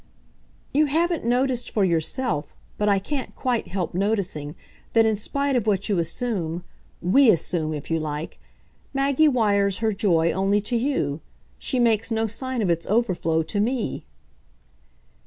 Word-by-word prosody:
"You 300 +2 +4
haven't 330 0 0
noticed 250 0 +1
for 205 -3 +1
yourself, 165 - -1 0.2
but 210 0 +2
I 200 - +4
can't 260 +7 -4
quite 245 -3 -1
help 185 -3 -3
noticing, 185 -7 -1 0.4
that 225 -1 +5
in 220 -1 +2
spite 280 +6 -1
of 230 -3 0
what 200 0 +1
you 195 -4 +2
assume 175 -2 -2 0.4
WE 240 +9 +5
assume, 165 -3 +1
if 150 +2 -7
you 165 - +2
like 150 0 -5 0.6
Maggie 275 +3 +3
wires 200 -7 +2
her 220 -1 0
joy 170 -5 +2
only 195 +2 +1
to 215 +4 -2
you. 230 - -1 0.4
She 260 - -1
makes 225 -2 +2
no 225 -1 0
sign 250 +2 -2
of 190 - 0
its 170 0 -1
overflow 180 -7 +1
to 205 +6 -2
me." 235 +3 -1
210 Hz, 155 wpm, -24 LUFS, 175-245 Hz, 0.6 s, that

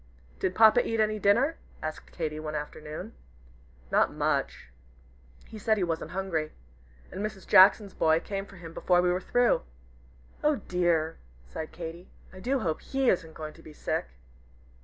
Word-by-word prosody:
"Did 185 - -1
Papa 220 +2 +7
eat 225 0 -2
any 215 0 +2
dinner?" 240 +11 +3 0.3
asked 155 0 -6
Katy, 155 -2 -3
one 155 0 -5
afternoon. 155 +7 -6 0.8
"Not - - +3
much. - - -1 0.8
He 220 - -10
said 220 +1 +2
he 195 - 0
wasn't 165 -2 -2
hungry. 175 -5 -2 0.6
And 190 +3 -4
Mrs. 210 -3 -5
Jackson's 195 +1 +6
boy 160 0 +3
came 195 +2 -5
for 195 - -14
him 165 -2 -10
before 180 +1 +2
we 180 - +3
were 180 +1 -1
through." 245 +3 +2 0.8
"Oh 300 0 +4
dear!" 170 - 0 0.3
sighed 155 - -7
Katy, 170 +1 -8 0.2
"I 185 - -10
do 260 +6 0
hope 160 -6 -1
he 270 -2 +1
isn't 165 -3 -3
going 155 -1 -6
to - - -16
be 155 - -12
sick. - - -2
180 Hz, 160 wpm, -28 LUFS, 160-215 Hz, 0.8 s, Papa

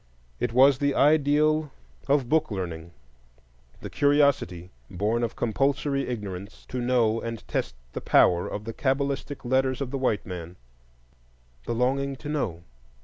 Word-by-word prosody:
It - - -1
was 130 +2 +5
the 140 -1 +1
ideal 150 +1 +3 0.4
of 140 -3 +2
"book 155 +3 +2
learning"; 85 -5 -5 0.9
the - - -6
curiosity, 140 - +2 0.2
born 105 +6 -1
of 115 - -2
compulsory 140 +4 0
ignorance, 100 -4 -6
to 125 - -3
know 120 -2 +2
and 115 -1 -6
test - - -2 0.2
the - - -4
power 90 0 +4
of 105 - -5
the 115 - -5
cabalistic 140 +1 -2
letters 130 +1 +1
of 135 -3 -4
the 135 - -3
white 120 -5 0
man, 90 -2 -7 1.1
the 120 - -1
longing 135 +3 0
to 130 - -10
know. 105 - -2
125 Hz, 145 wpm, -26 LUFS, 105-140 Hz, 1.1 s, was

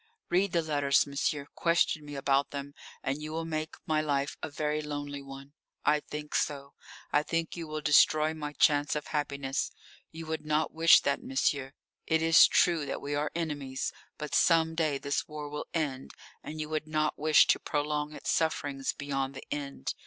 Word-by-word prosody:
Read 185 +2 +2
the 170 -1 +1
letters, 145 -3 +2
monsieur, 140 0 -1
question 170 -2 +1
me 145 -1 -8
about 135 0 +1
them, 140 0 -6 0.3
and 135 +3 -2
you 155 0 -5
will 165 +1 -3
make 155 -1 -3
my 155 -1 +1
life 140 -2 -1
a 160 - -4
very 150 +1 -1
lonely 145 -1 -5
one. 135 +1 -11 0.3
I 150 0 +4
think 150 0 -8
so. 140 -1 -1 0.4
I 145 - +4
think 165 +1 -2
you 170 -2 -6
will 155 0 -4
destroy 155 +2 +4
my 150 -2 -5
chance 145 -1 +3
of 150 - -3
happiness. 140 -3 -2 0.4
You 165 0 -8
would 160 0 -4
not 155 0 0
wish 165 +1 +7
that, 140 0 0
monsieur. 135 0 -1 0.3
It 160 0 +2
is 165 0 +8
true 170 -4 +3
that - - -3
we 145 +1 -4
are 145 +1 -1
enemies, 145 -5 -3 0.2
but 150 -1 -6
some 160 -1 +4
day 155 -4 0
this 140 +1 -2
war 150 -1 -6
will 150 +1 -6
end, 140 -5 -3 0.3
and 155 +1 -7
you 155 - -3
would 155 0 -3
not 155 0 0
wish 155 +1 +6
to - - +3
prolong 150 0 -2
its - - -3
sufferings 145 -4 0
beyond 135 -1 -3
the 135 - -8
end. 140 - -4
150 Hz, 185 wpm, -30 LUFS, 140-155 Hz, 0.4 s, is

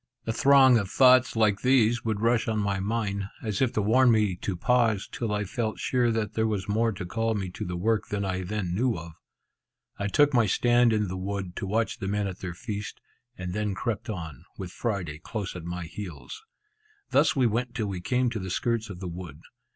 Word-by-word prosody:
A 115 - -1
throng 130 -1 +6
of 100 -3 -4
thoughts 130 +1 +5
like 105 -3 +2
these 120 -3 +3
would 110 -2 -2
rush 115 0 +2
on 110 -1 0
my 100 -2 0
mind, 100 -1 -2 0.2
as 105 -1 -2
if 130 -3 +3
to 105 - 0
warn 125 +5 +5
me 105 -5 +3
to 95 +1 -3
pause, 115 +1 +2
till 115 -3 -3
I 105 0 0
felt 110 +1 -3
sure 125 -2 +1
that 110 -2 -1
there 110 0 +1
was 105 -2 -2
more 115 +2 +1
to 95 -2 -6
call 115 +4 -1
me 95 -3 -3
to 105 - -6
the 90 -3 -4
work 110 +4 0
than 100 -1 -2
I 95 -1 -2
then 95 -1 -3
knew 120 +4 +1
of. 80 0 -8 0.9
I 100 - -1
took 145 +7 +3
my 120 -4 +4
stand 120 +4 +3
in 105 -2 +1
the 95 +1 -4
wood, 95 -1 -4
to 95 - -3
watch 110 +3 -1
the 95 - -4
men 105 +1 0
at 95 -1 -5
their 90 -2 -5
feast, 105 0 -6 0.4
and 90 -1 -5
then 105 -1 -1
crept 110 +2 -3
on, 80 - -6
with 95 -2 -6
Friday 90 -11 -3
close 100 +2 -5
at 85 -2 -7
my 90 +1 -4
heels. 95 - -8 0.7
Thus 145 +1 +4
we 130 -3 +3
went 120 +2 -1
till 115 -4 -1
we 95 -3 -4
came 125 +4 +1
to 115 - -3
the 95 -1 -5
skirts 115 +3 -1
of 95 -2 -8
the 95 - -4
wood. 85 -3 -8
105 Hz, 220 wpm, -27 LUFS, 95-115 Hz, 0.9 s, throng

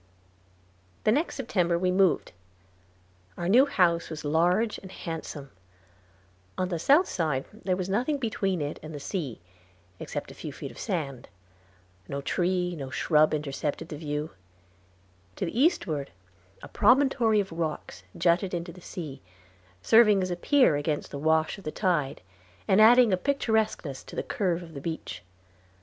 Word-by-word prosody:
The - - +4
next 300 +9 0
September 180 -9 0
we 180 +1 +1
moved. 185 -2 +2 1.1
Our 175 - -3
new 250 +9 +6
house 170 -9 +2
was 155 -1 -7
large 180 +9 +2
and 190 - -12
handsome. 155 -6 -7 1.1
On 185 0 -1
the 170 -3 -2
south 290 - +4
side 155 -7 -1
there 195 -4 -2
was 185 -1 -3
nothing 245 +10 0
between 195 - -1
it 145 - -5
and 155 0 -8
the - - -5
sea, 140 - -4 0.6
except - - -5
a - - -10
few - - -7
feet - - -8
of - - -13
sand. 140 -7 -4 0.8
No 140 - -4
tree 180 +4 0
or 135 -1 -6
shrub 155 +2 +3
intercepted 145 -1 -3
the - - -5
view. 150 0 -4 1.0
To - - -2
the 220 - -3
eastward 195 - +1 0.5
a - - -7
promontory 235 -2 +3
of 195 -3 -2
rocks 165 -2 -4 0.2
jutted 175 +2 +2
into 170 0 -4
the 180 - -14
sea, 160 - -7 0.6
serving 215 -4 +6
as 185 - -2
a - - 0
pier 255 - +3
against 145 0 -2
the 140 - -5
wash 160 +4 +1
of - - -14
the 155 - -4
tide, 150 - -1 0.4
and 195 - +5
adding 235 -1 +7
a - - +3
picturesqueness 220 - -1
to - - -10
the - - -2
curve 180 -4 -1
of 165 -1 -12
the 140 - -7
beach. 150 - -5
175 Hz, 160 wpm, -27 LUFS, 155-210 Hz, 1.1 s, adding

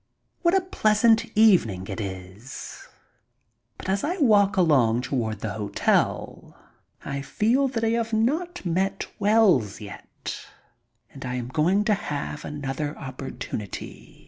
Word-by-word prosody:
What 340 +1 +3
a - - +2
pleasant 225 - +3
evening 170 - +4
it 95 +1 -5
is! 95 +5 -8 0.9
But - - -9
as 195 +1 0
I 350 +5 -1
walk 210 - +4
along 130 -10 +4
toward 110 -6 -2
the 105 -2 -3
hotel 105 -1 -1 0.5
I 140 0 -3
feel 235 - +1
that 230 -3 -3
I 225 - +3
have 230 0 0
not 300 - 0
met 190 +3 0
Wells 200 - +3
yet. 100 -2 -8 0.7
And 135 - -9
I 125 -1 -3
am 125 -1 -4
going 175 +9 +2
to 215 0 +2
have 150 -5 -4
another 145 +1 -4
opportunity. 130 -6 -7
165 Hz, 130 wpm, -25 LUFS, -, 0.9 s, evening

